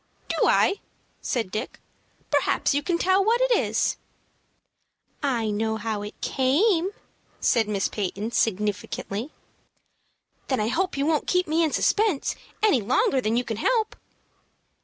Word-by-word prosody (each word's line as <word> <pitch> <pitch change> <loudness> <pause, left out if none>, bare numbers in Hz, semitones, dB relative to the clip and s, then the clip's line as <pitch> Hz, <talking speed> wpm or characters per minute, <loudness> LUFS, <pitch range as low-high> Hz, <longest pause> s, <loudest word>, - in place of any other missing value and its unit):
"Do - - +2
I?" 395 - +3 0.4
said 225 -7 -2
Dick. 215 +5 -5 0.5
"Perhaps - - +2
you 285 - +1
can 340 +4 0
tell 375 +3 +3
what 455 +4 +2
it - - +2
is." - - 0 1.2
"I 235 -6 0
know 220 +1 -1
how 215 -1 -3
it 210 +1 -8
came," 330 - +2 0.5
said 225 -3 +2
Miss 200 -2 0
Peyton, 205 +2 -3
significantly. 210 +2 -1 1.2
"Then 260 - 0
I 215 +1 0
hope 370 +4 -1
you 280 - +1
won't 310 -1 +1
keep 360 0 +2
me 320 +2 +2
in 315 - +1
suspense 410 -5 +1 0.3
any 350 - +4
longer 265 - +2
than 225 0 0
you 245 - +1
can 225 -3 -4
help." 445 - +1
260 Hz, 140 wpm, -25 LUFS, 220-360 Hz, 1.2 s, any